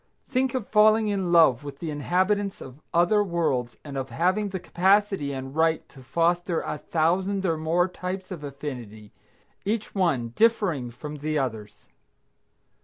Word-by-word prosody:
Think 260 -1 0
of 245 -6 -2
falling 215 0 +4
in 190 -4 -1
love 155 -7 +5
with 140 -1 -8
the 160 +1 -4
inhabitants 190 +7 0
of 130 +3 -11
other 175 +5 +3
worlds 155 -10 -1
and 145 -2 -8
of 135 0 -5
having 190 +5 +1
the 190 -1 -4
capacity 190 -3 +2
and 135 0 -6
right 160 0 +1
to 135 - -15
foster 170 +4 +1
a 150 - -4
thousand 185 +6 0
or 165 -3 +2
more 165 +3 +1
types 185 +1 -6
of 170 -5 -6
affinity, 125 -7 -7 0.5
each 215 +2 -2
one 160 - +1
differing 180 - +1
from 150 +5 -8
the 155 +1 -2
others! 110 -6 -4
170 Hz, 155 wpm, -26 LUFS, 140-195 Hz, 0.5 s, love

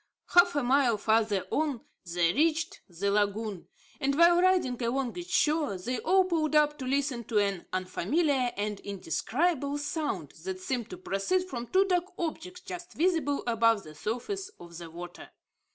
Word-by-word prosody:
Half 350 -1 +5
a 290 - +1
mile 250 -2 +3
farther 215 -2 +1
on 290 -6 0 0.3
they 170 -1 +2
reached 320 - +1
the 190 +3 -1
lagoon; 205 -1 -1 0.3
and 275 -1 +1
while 345 +1 +6
riding 360 -10 +2
along 245 +1 -1
its 350 0 -7
shore, 305 - +2
they 240 +7 -3
all 375 +3 +4
pulled 315 -4 0
up 295 0 +3
to 260 - -4
listen 270 -2 0
to 220 - -1
an 200 -3 0
unfamiliar 250 - 0
and 205 0 -2
indescribable 280 - -1
sound, 295 +1 -3
that 375 0 -4
seemed 255 - -3
to 365 - -7
proceed 370 - -1
from 240 -7 -5
two 380 +7 +3
dark 360 -2 +1
objects 355 +2 -5
just 355 +1 -8
visible 320 -5 +1
above 230 -3 +3
the 155 - -11
surface 370 - -4
of 170 0 -12
the 170 0 -8
water. 175 +2 -9
275 Hz, 165 wpm, -29 LUFS, 210-340 Hz, 0.3 s, while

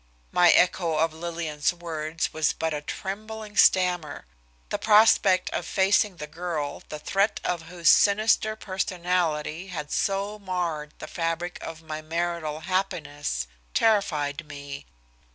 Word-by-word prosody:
My 175 -1 +5
echo 170 -2 +3
of 160 0 +1
Lillian's 160 -2 -2
words 165 -2 -4
was 155 -1 +1
but 160 -1 -2
a 150 - -3
trembling 215 +5 -6
stammer. 180 - +3 0.4
The - - -2
prospect 210 -3 +5
of - - -2
facing 195 +1 +2
the 150 - -6
girl 155 -2 -4
the 150 - -5
thread 195 +7 0
of 175 -2 -1
whose 170 -1 -3
sinister 215 +1 +4
personality 180 -4 -1
had 150 -5 -6
so 200 +1 -1
marred 175 -6 -3
the - - -7
fabric 170 +1 -3
of 160 0 -8
my 155 -1 -5
marital 165 -1 -3
happiness 155 - -2 0.3
terrified 155 -8 +1
me. 140 - -8
170 Hz, 130 wpm, -26 LUFS, 155-190 Hz, 0.4 s, My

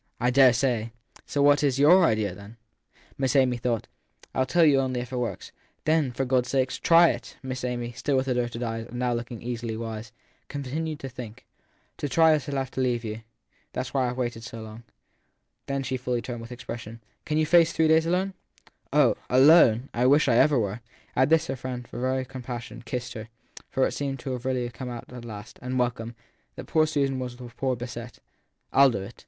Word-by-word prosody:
I 125 +1 +2
dare 130 0 +7
say! 120 -2 0 0.3
So 145 - +1
what 145 0 +5
is 135 -3 +2
your 170 +7 +6
idea? 105 - -2 0.6
Miss 135 0 +1
Amy 130 -3 +4
thought. 120 -2 -2 0.2
( - - -26
I - - 0
ll 130 - +1
tell 170 +5 +4
you 140 -3 +5
only 130 -2 -1
if 125 0 -6
it - - -1
works/ 125 -1 -4 0.3
Then, 155 -4 +2
for 135 +2 -2
God 125 -1 +2
s - - -9
sake, 130 -1 +1
try 170 0 +5
it! - - -8
Miss 130 -1 -5
Amy, 120 -1 -3
still 130 +3 -1
with 130 +1 0
averted 120 -2 -1
eyes 115 -1 -4
and 120 - -8
now 125 0 0
looking 120 0 -5
easily 120 -2 -4
wise, 110 -1 -6 0.4
continued 145 +3 -4
to 135 - -5
think. 120 -3 -9 0.5
To 145 - -3
try 160 +5 +5
it - - +6
I - - +4
shall 140 +1 -5
have 135 -1 -2
to 130 - -2
leave 120 -2 0
you. 110 +1 -5 0.5
That - - -1
s - - -7
why 130 -2 +2
I 120 - -2
ve - - -9
waited 120 -3 -3
so 115 -1 -8
long. 110 +1 -10 0.9
Then 140 0 -1
she 130 0 -2
fully 125 -1 -2
turned, 120 -1 -5
and - - -8
with 115 +2 -10
expression: 115 -2 -7 0.2
Can 150 - -1
you 155 - +3
face 170 +1 +5
three 160 -1 +2
days 160 +1 +4
alone? 185 +3 0 0.6
Oh - - +4
" - - -33
alone 130 -2 +6
"! - - -46
I 125 +2 +2
wish 145 +3 +5
I 120 - +4
ever 140 +2 +5
were! 105 0 -1 0.3
At 130 +2 +3
this 160 0 +4
her 135 - -3
friend, 125 -1 -6
as - - -23
for 120 - -6
very 130 +1 0
compassion, 125 -2 -7
kissed 125 0 -4
her; 110 -1 -8 0.4
for 130 - +2
it - - -1
seemed 135 -2 -4
really 130 -2 -2
to 130 0 -1
have 120 0 -5
come 125 +1 -6
out 120 0 -8
at 120 -1 -8
last 110 -1 -9
and 125 +1 -3
welcome! 120 -2 -1 0.4
that - - -8
poor 155 -1 +2
Susan 140 -3 0
was 125 -1 -5
the 120 -1 -10
worse 130 -2 +1
beset. 120 0 -7 0.6
I 140 - +7
ll - - +6
do 100 -6 -3
it 105 +5 -9
125 Hz, 230 wpm, -26 LUFS, 120-135 Hz, 0.9 s, dare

